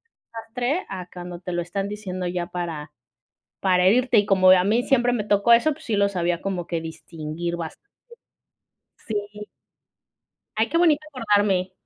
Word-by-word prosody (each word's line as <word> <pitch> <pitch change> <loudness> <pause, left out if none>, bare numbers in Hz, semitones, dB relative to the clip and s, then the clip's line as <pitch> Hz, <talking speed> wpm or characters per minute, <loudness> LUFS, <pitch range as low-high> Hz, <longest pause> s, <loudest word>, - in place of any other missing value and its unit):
desastre" 245 +8 -4
a 185 -2 -6
cuando 175 -1 -8
te 180 0 -6
lo 175 0 -1
están 195 +3 -3
diciendo 185 -3 -5
ya 175 0 -2
para 170 -4 -5 0.7
para 180 -1 +3
herirte. 245 +4 +4
Y 205 - +4
como 185 -2 +5
a 185 -1 +6
mí 230 +4 +2
siempre 245 -3 +2
me 215 -4 -1
tocó 205 +3 +4
eso, 240 +7 +4
pues 315 +2 -9
sí 220 - 0
lo 200 0 +3
sabía 175 -2 -1
como 185 -3 -3
que 165 -2 -2
distinguir 165 +1 -5
bastante. 170 - -8 1.2
Sí. 210 -1 -4 1.1
Ay, 220 +1 +1
qué 335 - +1
bonito 320 -4 +4
acordarme. 205 -7 +1
195 Hz, 160 wpm, -23 LUFS, 175-225 Hz, 1.2 s, a